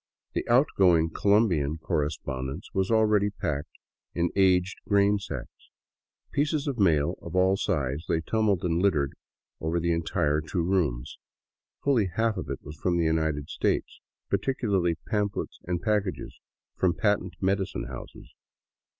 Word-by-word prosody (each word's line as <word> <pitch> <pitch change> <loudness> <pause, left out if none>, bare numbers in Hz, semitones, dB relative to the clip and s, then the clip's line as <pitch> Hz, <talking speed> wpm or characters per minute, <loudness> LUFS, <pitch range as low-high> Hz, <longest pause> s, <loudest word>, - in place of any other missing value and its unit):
The - - -2
outgoing 95 - +4
Colombian 90 -9 +2
correspondence 70 -4 -3
was 95 -1 0
already 105 -2 +3
packed 75 -7 -4 0.4
in 85 0 +1
aged 95 -1 +3
grainsacks. 100 0 0 0.6
Pieces 145 0 0
of 135 -5 -3
mail 80 -7 +2
of - - -7
all 95 +1 +4
sizes 75 -7 -1
lay 80 - +2
tumbled 105 -1 +1
and 85 -1 +1
littered 75 -8 +2 0.5
over 80 +2 -1
the 85 +1 0
entire 80 -2 +1
two 85 +2 -2
rooms. 80 -10 -1 0.6
Fully 125 -8 +3
half 110 +5 0
of - - -5
it - - -5
was 75 +2 -9
from 85 +2 0
the 85 - +2
United 80 -2 0
States, - - -1 0.3
particularly 100 -10 0
pamphlets 105 -2 -2
and 85 -1 -2
packages 105 -3 -1 0.4
from 90 -1 +1
patent 105 -4 0
medicine 95 0 0
houses. - - -10
90 Hz, 135 wpm, -27 LUFS, 80-105 Hz, 0.6 s, outgoing